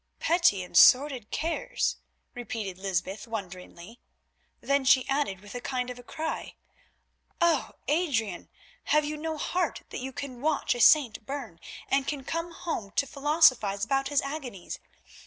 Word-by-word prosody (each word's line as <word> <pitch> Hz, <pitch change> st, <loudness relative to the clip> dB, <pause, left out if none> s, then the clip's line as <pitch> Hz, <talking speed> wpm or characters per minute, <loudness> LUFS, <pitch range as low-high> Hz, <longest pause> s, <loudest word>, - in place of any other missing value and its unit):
"Petty 330 Hz, -, +3 dB
and 180 Hz, -, -12 dB
sordid 255 Hz, 0 st, +6 dB
cares!" 335 Hz, +10 st, -1 dB, 0.4 s
repeated 215 Hz, -6 st, -5 dB
Lysbeth 190 Hz, +2 st, -3 dB
wonderingly, 190 Hz, 0 st, -8 dB, 0.6 s
then 280 Hz, 0 st, +1 dB
she 260 Hz, -1 st, +4 dB
added 270 Hz, -9 st, -1 dB
with 205 Hz, 0 st, -12 dB
a 245 Hz, -, -5 dB
kind 250 Hz, -1 st, -2 dB
of 245 Hz, -1 st, -11 dB
cry: 320 Hz, 0 st, -4 dB, 0.8 s
"Oh! 335 Hz, -5 st, +2 dB
Adrian, 255 Hz, -, 0 dB, 0.4 s
have 300 Hz, 0 st, +3 dB
you 300 Hz, +1 st, -3 dB
no 315 Hz, +1 st, -4 dB
heart 350 Hz, +1 st, -1 dB
that -, -, -6 dB
you 265 Hz, +1 st, -5 dB
can 265 Hz, -3 st, -7 dB
watch 305 Hz, 0 st, +1 dB
a 245 Hz, -, -3 dB
saint 250 Hz, -8 st, +5 dB
burn 250 Hz, -12 st, -6 dB, 0.3 s
and 275 Hz, 0 st, +1 dB, 0.2 s
come 335 Hz, +1 st, -3 dB
home 325 Hz, -, -4 dB
to 280 Hz, -, +2 dB
philosophise 265 Hz, -9 st, +3 dB
about 270 Hz, +3 st, 0 dB
his 290 Hz, -1 st, +1 dB
agonies? 270 Hz, -, -6 dB
265 Hz, 140 wpm, -28 LUFS, 215-300 Hz, 0.8 s, sordid